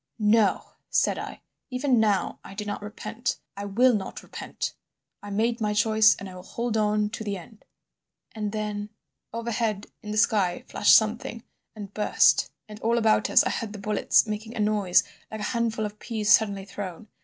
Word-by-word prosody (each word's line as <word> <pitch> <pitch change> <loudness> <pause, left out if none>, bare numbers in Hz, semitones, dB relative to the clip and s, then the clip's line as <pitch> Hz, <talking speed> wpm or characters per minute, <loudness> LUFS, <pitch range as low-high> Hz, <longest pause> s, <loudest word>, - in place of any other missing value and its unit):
"'No,' 215 -1 +3 0.3
said - - +2
I. - - -7 0.3
'Even 255 -1 +1
now, 210 -3 +1
I 195 - -11
do 210 +1 -4
not 205 0 -4
repent. 225 +3 -4 0.2
I 200 +1 -5
will 240 +6 +4
not 195 -3 -4
repent; - - -5 0.5
I 205 - -9
made 230 +3 0
my 210 -1 0
choice, 215 0 +5
and 195 - -8
I 185 - -9
will 180 - -9
hold 235 +4 -3
on 210 -1 +1
to 225 - -5
the 200 -2 -3
end.' 210 +5 -14 0.7
"And 210 -2 -3
then— 210 -1 -3 0.4
"Overhead 225 -3 -2 0.2
in 210 - -9
the 215 - -2
sky 195 -5 +2
flashed - - +5
something 230 +2 +1 0.3
and 205 -2 -8
burst, 210 - +3 0.2
and 210 0 -10
all 230 +2 +1
about 220 -2 +3
us - - +6
I - - 0
heard 220 -3 -4
the - - -7
bullets 210 +3 +2
making 220 +2 -5
a - - -5
noise 210 -4 +3 0.3
like 220 -1 -6
a 210 - -2
handful 230 -2 0
of 210 0 -7
peas 215 -3 -1
suddenly 200 -2 +4
thrown. 195 0 -7
215 Hz, 185 wpm, -26 LUFS, 205-225 Hz, 0.7 s, us